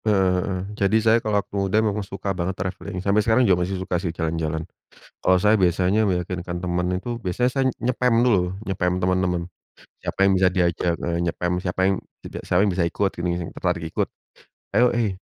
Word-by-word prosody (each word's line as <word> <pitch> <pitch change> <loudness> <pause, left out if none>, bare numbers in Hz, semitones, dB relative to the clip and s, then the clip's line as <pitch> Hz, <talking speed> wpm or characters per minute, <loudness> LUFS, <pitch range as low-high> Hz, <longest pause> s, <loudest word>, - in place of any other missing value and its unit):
Eee, 95 -2 +1
jadi 100 +1 +2
saya 110 +1 +4
kalau 105 -2 0
waktu 100 - -3
muda 95 +2 +1
memang 105 -1 +1
suka 100 0 -4
banget 90 +1 -3
travelling. 90 0 -5
Sampai 100 +1 +3
sekarang 115 +4 +3
juga 90 -4 +3
masih 95 +2 -1
suka 90 -2 -2
sih 90 - -2
jalan-jalan. 80 -1 -2 0.6
Kalau 95 0 +4
saya 105 +4 +3
biasanya 95 +4 +2
meyakinkan 90 -1 -3
teman 90 0 -1
itu 120 +4 -5
biasanya 115 +6 0
saya 135 - +1
nge-spam 125 -1 +2
dulu, 95 -6 +2
nge-spam 90 -2 0
teman-teman. 90 -1 +1 0.6
Siapa - - -5
yang 100 - +5
bisa 95 - +5
diajak 85 -2 +1
heeh, 85 0 -1
nge-spam, 90 +2 -1
siapa 90 0 -4
yang 95 +1 +3 0.3
jeda - - -7
siapa 90 +2 +3
yang 105 - +2
bisa 90 -2 +1
ikut 100 +3 0
gini, 85 +1 -3
yang 80 - -7
tertarik 90 -2 -2
ikut. - - 0 0.7
"Ayo, 120 +5 +5
hei 100 -6 -1
95 Hz, 190 wpm, -23 LUFS, 90-105 Hz, 0.7 s, yang